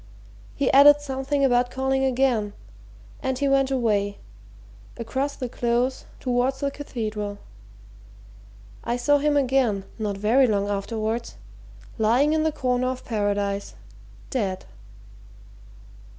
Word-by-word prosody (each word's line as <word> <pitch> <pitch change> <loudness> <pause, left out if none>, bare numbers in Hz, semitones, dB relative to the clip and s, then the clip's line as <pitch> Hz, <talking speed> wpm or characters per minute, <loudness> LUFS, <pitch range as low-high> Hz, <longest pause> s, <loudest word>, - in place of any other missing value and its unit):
He 275 -2 +1
added 290 +2 +8
something 275 0 -1
about 245 -1 +2
calling 265 +1 0
again, 250 -5 +1 0.7
and 265 -1 -1
he 280 +1 0
went 275 -1 +3
away 210 -6 0 0.8
across 270 +5 -2
the 255 - -4
Close 240 +2 -1
towards 255 +1 0
the 280 0 0
Cathedral. 215 -7 -5 1.5
I 240 - -1
saw 290 +4 +3
him 290 0 +2
again 250 -7 +1
not 205 -2 -2
very 235 +6 +3
long 205 -2 0
afterwards 215 - -3 0.6
lying 245 +8 +3
in 315 - +2
the 315 0 +1
corner 255 -4 0
of 255 0 -4
Paradise 205 -2 -2 0.6
dead!" 195 -8 -2
250 Hz, 115 wpm, -24 LUFS, 215-270 Hz, 1.5 s, added